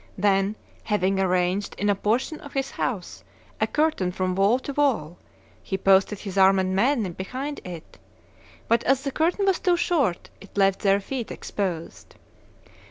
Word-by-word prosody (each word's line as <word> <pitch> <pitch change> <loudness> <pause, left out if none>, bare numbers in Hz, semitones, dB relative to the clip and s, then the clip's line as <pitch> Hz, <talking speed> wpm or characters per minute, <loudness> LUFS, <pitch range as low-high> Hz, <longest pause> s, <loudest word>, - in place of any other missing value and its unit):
Then, 195 +1 +2 0.3
having 195 -2 +1
arranged, 185 +1 0
in 205 - -1
a 205 - +4
portion 230 +10 -1
of 285 - -11
his 270 0 -2
house, 200 -8 -4 0.4
a - - +3
curtain 300 - +1
from 185 0 -1
wall 200 +6 +3
to 275 +2 -6
wall, 230 - 0 0.4
he 190 - -3
posted 195 +2 +3
his 195 -1 -4
armed 190 -1 +5
men 230 +7 +2
behind 260 - -5
it; 175 -3 -10 0.7
but, 230 - +2
as 270 +1 +2
the 275 - -2
curtain 345 +7 +1
was 385 -2 +2
too 360 -2 +2
short, 280 - 0
it 195 +1 -15
left 195 -1 +3
their 200 -1 +3
feet 245 +2 -5
exposed. 175 -5 -5
200 Hz, 160 wpm, -25 LUFS, 190-270 Hz, 0.7 s, armed